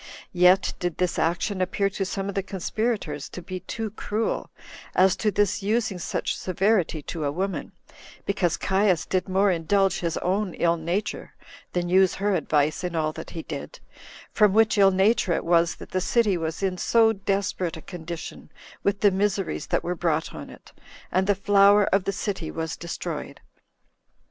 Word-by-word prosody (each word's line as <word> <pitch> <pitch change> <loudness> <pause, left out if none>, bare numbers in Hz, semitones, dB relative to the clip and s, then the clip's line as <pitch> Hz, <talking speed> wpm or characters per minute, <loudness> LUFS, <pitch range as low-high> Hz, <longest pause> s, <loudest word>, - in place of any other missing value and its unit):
Yet 180 +1 +4
did 175 -2 -2
this 180 -1 0
action 180 +4 0
appear 195 +2 +1
to 195 0 -2
some 195 +1 -3
of 200 - -3
the 195 - 0
conspirators 195 - -3
to - - -8
be 185 +1 -6
too 220 +3 -5
cruel, 215 +1 -2 0.5
as 185 0 +5
to 215 - +1
this 205 0 +1
using 215 -1 0
such - - -2
severity 185 -4 0
to 160 +1 -5
a 140 - 0
woman, 190 +5 -3 0.5
because 180 -4 0
Caius 190 -3 +1
did 185 0 -1
more 195 +1 +3
indulge 190 +3 +1
his 170 -2 -2
own 190 +1 -1
ill 170 0 +2
nature 170 +5 -3 0.4
than 175 -1 -1
use 185 +1 +4
her 200 +1 0
advice 155 -2 +1
in 175 -1 -3
all 155 -1 0
that - - -8
he 165 -2 -6
did; - - -7 0.5
from 210 -3 +4
which 220 +1 +4
ill 200 -2 +6
nature 195 0 +2
it - - -2
was 170 0 +3
that - - -12
the 185 - 0
city 215 0 +2
was 165 +2 -3
in 185 -2 -1
so 225 +2 +4
desperate 195 -4 -2
a - - -10
condition 170 -2 -8 0.3
with 200 0 0
the 205 - +5
miseries 195 0 -1
that - - 0
were 175 - -1
brought 165 -3 -1
on - - -8
it, - - -15 0.4
and 190 +1 +1
the 205 - +3
flower 200 +1 +5
of 195 -1 +2
the - - 0
city 190 -4 -3
was 160 0 -4
destroyed. 170 -1 -6
190 Hz, 180 wpm, -25 LUFS, 170-200 Hz, 0.5 s, ill